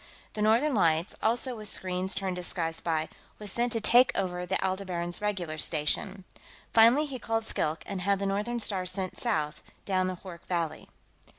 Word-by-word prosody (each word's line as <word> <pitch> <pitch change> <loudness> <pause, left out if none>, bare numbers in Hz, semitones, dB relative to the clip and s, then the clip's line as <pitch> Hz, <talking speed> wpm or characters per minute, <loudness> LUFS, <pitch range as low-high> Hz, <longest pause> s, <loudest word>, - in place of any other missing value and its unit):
The 210 - -4
Northern 230 +8 +4
Lights, 165 -4 +2
also 240 +3 +1
with 215 -2 -6
screens 185 +1 -1
tuned 190 -1 -2
to - - -3
the 180 - -3
Sky 165 -2 -1
Spy, 160 -1 -1 0.3
was 210 -2 -4
sent 240 +3 +1
to 225 - +1
take 245 +3 +6
over 180 -2 -2
the 190 - +1
Aldebaran's 185 -2 -2
regular 180 -7 -2
station. 180 +6 -1 0.5
Finally, 235 +7 +6
he 270 -4 -5
called 225 -1 -1
Skilk 155 -7 -1
and 195 -2 -4
had 200 +2 +2
the 200 - -2
Northern 205 +5 -1
Star 190 -4 0
sent 185 0 -2
south 155 -11 -1 0.2
down 185 -2 +1
the 185 - -2
Hoork 175 -3 -9
Valley. 170 -3 -2
190 Hz, 185 wpm, -29 LUFS, 175-220 Hz, 0.5 s, take